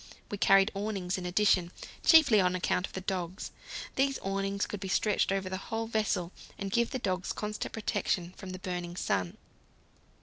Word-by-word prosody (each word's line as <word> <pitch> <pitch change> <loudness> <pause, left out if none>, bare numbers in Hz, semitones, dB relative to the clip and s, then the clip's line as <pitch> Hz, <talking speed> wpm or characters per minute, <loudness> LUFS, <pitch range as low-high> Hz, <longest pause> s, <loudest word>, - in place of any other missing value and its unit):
We 205 - -4
carried 195 +1 +5
awnings 195 -3 -2
in 180 - -4
addition, 180 -2 +3 0.3
chiefly 280 - +7
on 180 0 +2
account 180 0 0
of - - -18
the 190 - -4
dogs. 185 -1 -3 0.5
These 275 0 +2
awnings 195 +1 -1
could 210 - -5
be 195 - -5
stretched 205 +2 +2
over 195 -1 -1
the 190 0 -3
whole 225 0 -1
vessel 210 -6 0 0.3
and 195 -1 -4
give 235 +2 +2
the - - -2
dogs 185 -6 -2
constant 210 0 -4
protection 195 -5 -1
from 190 - -9
the 185 - -5
burning 180 -2 -4
sun. 95 - -1
195 Hz, 175 wpm, -30 LUFS, 180-210 Hz, 0.5 s, chiefly